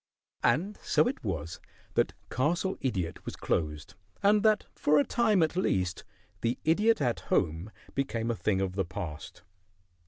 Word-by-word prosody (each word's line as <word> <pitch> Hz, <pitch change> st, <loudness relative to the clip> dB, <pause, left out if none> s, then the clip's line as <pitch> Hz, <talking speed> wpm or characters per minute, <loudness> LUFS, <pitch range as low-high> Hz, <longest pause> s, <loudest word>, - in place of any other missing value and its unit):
And 180 Hz, -, +1 dB
so -, -, +3 dB
it 255 Hz, -, -3 dB
was 85 Hz, -5 st, -3 dB, 0.3 s
that -, -, +1 dB, 0.2 s
Castle 170 Hz, +8 st, +1 dB
Idiot 95 Hz, -11 st, -2 dB
was -, -, -6 dB
closed, 75 Hz, -2 st, -2 dB, 0.3 s
and 205 Hz, +1 st, +5 dB
that 215 Hz, -1 st, +3 dB
for 150 Hz, +1 st, +3 dB
a 145 Hz, -, +5 dB
time 215 Hz, -4 st, +3 dB
at 160 Hz, -, 0 dB
least 95 Hz, -, 0 dB, 0.4 s
"The 120 Hz, +1 st, 0 dB
Idiot 210 Hz, +6 st, +3 dB
at 120 Hz, -4 st, +1 dB
Home" 85 Hz, +2 st, +1 dB, 0.2 s
became 120 Hz, -4 st, -1 dB
a -, -, -1 dB
thing 100 Hz, -3 st, 0 dB
of 95 Hz, -1 st, -1 dB
the 95 Hz, 0 st, 0 dB
past. 90 Hz, -4 st, -7 dB
120 Hz, 155 wpm, -29 LUFS, -, 0.4 s, and